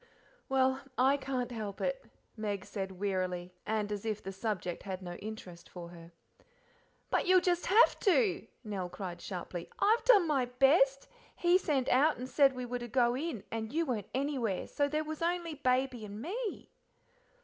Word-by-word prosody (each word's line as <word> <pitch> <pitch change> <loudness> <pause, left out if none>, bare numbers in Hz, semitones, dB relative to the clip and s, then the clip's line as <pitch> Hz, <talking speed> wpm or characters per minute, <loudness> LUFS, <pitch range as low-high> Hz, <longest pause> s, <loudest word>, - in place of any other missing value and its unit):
"Well, 265 0 +2 0.2
I 265 +3 +5
can't 260 -3 -3
help 215 -4 -5
it," - - -1 0.3
Meg 205 -3 -3
said 190 -2 -4
wearily, 185 -2 -2
and 210 -1 -1
as 205 -1 -3
if 215 -2 -3
the 195 - -5
subject 190 -3 -3
had 190 -1 -5
no 175 -1 -5
interest 200 -5 -9
for 175 -2 -8
her. 170 -1 -13 1.0
"But - - +1
you'll 370 0 +7
just 355 -1 0
have 435 +5 +5
to!" 400 +1 +2 0.2
Nell 195 -5 -4
cried 175 -2 -6
sharply, 175 -2 -6
"I've 440 +3 +3
done 420 -8 +7
my 275 -5 +2
best: 270 +2 +3 0.3
he 350 0 +3
sent 275 -7 0
out 285 +4 +4
and 250 - -5
said 275 0 +4
we 250 -1 -5
were 245 0 -3
to 240 - -6
go 240 0 +2
in, 275 - -3
and 220 -1 -3
you 330 +3 +1
weren't 230 - -3
anywhere, 260 -8 -1
so 285 - 0
there 305 +2 -1
was 310 +1 -6
only 340 -1 -1
Baby 255 -4 0
and 205 0 -7
me." 410 - -4
250 Hz, 175 wpm, -32 LUFS, 200-300 Hz, 1.0 s, you'll